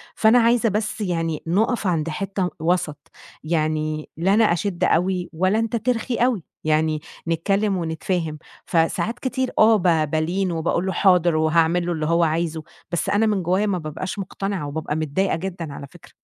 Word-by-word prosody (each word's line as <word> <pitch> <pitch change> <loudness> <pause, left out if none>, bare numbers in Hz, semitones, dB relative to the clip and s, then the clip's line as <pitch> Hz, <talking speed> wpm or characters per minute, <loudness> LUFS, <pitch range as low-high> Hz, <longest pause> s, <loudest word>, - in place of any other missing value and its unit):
فأنا 225 +3 +5
عايزة 230 -1 +3
بس 210 +1 -2
يعني 165 -5 -2
نُقَف 215 +4 +1
عند 165 -2 0
حتّة 195 +1 -2
وَسَط، 160 -3 -1 0.3
يعني 155 -1 -1
لا 185 +4 +2
أنا 225 +2 +5
أشِد 180 0 -2
أوي 180 +1 +1
ولا 185 +6 +1
أنت 225 +1 -1
ترخي 240 +1 -1
أوي، 240 -7 +1 0.2
يعني 155 0 +1 0.3
نتكلّم 195 +4 +1
ونتفاهم. 165 -1 -2 0.3
فساعات 175 +7 0
كتير 260 0 -2
آه، 220 +1 +7
ب 165 -5 +2
بالين 175 +4 0
وباقول 170 +2 -1
له 190 - -1
حاضر 175 -4 +4
وهاعمل 165 +2 +2
له 175 - -1
اللي 155 -2 -2
هو 170 +2 +2
عايزه، 160 0 -1 0.3
بس 175 - -1
أنا 205 +2 +3
من 205 -4 +1
جوّايا 185 +4 +1
ما 195 -3 0
بابقاش 170 +5 -5
مُقتنعة، 195 -3 -3
وبابقى 150 +1 -3
متضايقة 160 +5 0
جدًا 170 -4 -5
على 140 - -8
فكرة. - - -17
175 Hz, 165 wpm, -22 LUFS, 160-200 Hz, 0.3 s, آه